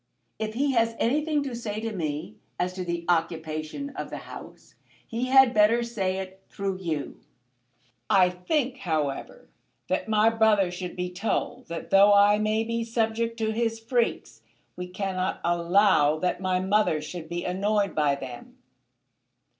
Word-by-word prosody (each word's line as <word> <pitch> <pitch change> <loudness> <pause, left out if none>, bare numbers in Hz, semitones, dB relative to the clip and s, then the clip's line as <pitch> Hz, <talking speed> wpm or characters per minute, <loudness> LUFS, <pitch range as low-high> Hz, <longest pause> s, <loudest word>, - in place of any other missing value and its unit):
If 220 0 -3
he 280 +3 +1
has 230 -2 +1
anything 295 +4 +1
to 265 -4 -4
say 215 -3 -4
to 225 0 -4
me 160 +4 -4 0.2
as 180 +1 -1
to 185 0 -4
the 170 -1 -3
occupation 165 - -2
of - - -6
the - - -6
house - - -11 0.3
he 235 +2 -3
had 265 -1 +6
better 220 +3 +4
say 195 -6 -2
it 190 0 -7
through 195 -1 -3
you. 160 -6 -4 0.9
I 185 -2 +5
think, 255 - -1
however, 155 - -3 0.4
that - - -1
my 215 +1 +4
brother 215 -5 +3
should 180 0 -6
be 180 0 -3
told 225 +6 -2
that 170 0 -7
though 200 +1 +7
I 205 +1 +5
may 215 +1 +1
be 230 0 -2
subject 230 0 -1
to 220 -1 0
his 225 0 -1
freaks, 225 - -1 0.3
we 180 0 -6
cannot 185 0 -2
allow 170 -3 +3
that 180 +3 -1
my 185 -1 +1
mother 190 -4 +2
should 160 +1 -7
be 175 0 -4
annoyed 200 +1 0
by 150 -2 +2
them. 130 -3 -9
200 Hz, 155 wpm, -26 LUFS, 175-225 Hz, 0.9 s, though